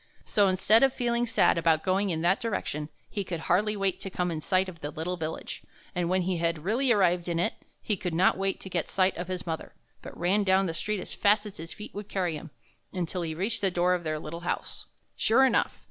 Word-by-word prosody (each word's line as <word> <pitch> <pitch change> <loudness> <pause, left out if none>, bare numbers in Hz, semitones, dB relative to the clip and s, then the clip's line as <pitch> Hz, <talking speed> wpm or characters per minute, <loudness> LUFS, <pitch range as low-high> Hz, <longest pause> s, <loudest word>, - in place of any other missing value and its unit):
So 205 -2 +3
instead 190 +4 +4
of 270 -1 +5
feeling 240 -1 0
sad 225 -6 +3
about 160 -1 +3
going 195 +2 +1
in 160 -2 -1
that 180 +3 +3
direction, 155 -9 -3 0.2
he 200 - -3
could 175 -3 -5
hardly 210 +6 +1
wait 195 -1 0
to 195 - -5
come 180 -1 -1
in 155 -1 -3
sight 185 +3 +2
of 170 -3 -10
the 145 - -3
little 165 +4 -3
village; 160 -2 -5 0.3
and 175 -1 -1
when 185 0 +2
he 180 0 0
had 165 -2 -1
really 240 +7 +2
arrived 180 -5 +3
in 170 - 0
it, 180 +6 +1 0.3
he 210 - 0
could 180 -3 -3
not 185 +3 +4
wait 195 0 -1
to 190 - -7
get 175 -3 -1
a - - -12
sight 185 0 +2
of 175 +1 -5
his 185 -1 -4
mother, 160 -2 -5 0.3
but - - -10
ran 190 +4 +2
down 190 0 +3
the 165 - -2
street 210 +4 -2
as - - -8
fast 205 +1 +3
as 205 - -9
his 165 +1 -8
feet 210 - -9
would 205 0 -7
carry 180 -4 -1
him, 160 +2 -8 0.4
until 180 -1 -2
he 160 -2 -3
reached 210 +7 -1
the 195 - +3
door 180 0 +2
of 180 -1 -1
their 155 -1 -1
little 155 +2 -6
house. 175 - -4 0.3
Sure 265 +4 +4
enough! 265 - +1
185 Hz, 245 wpm, -28 LUFS, 170-200 Hz, 0.4 s, of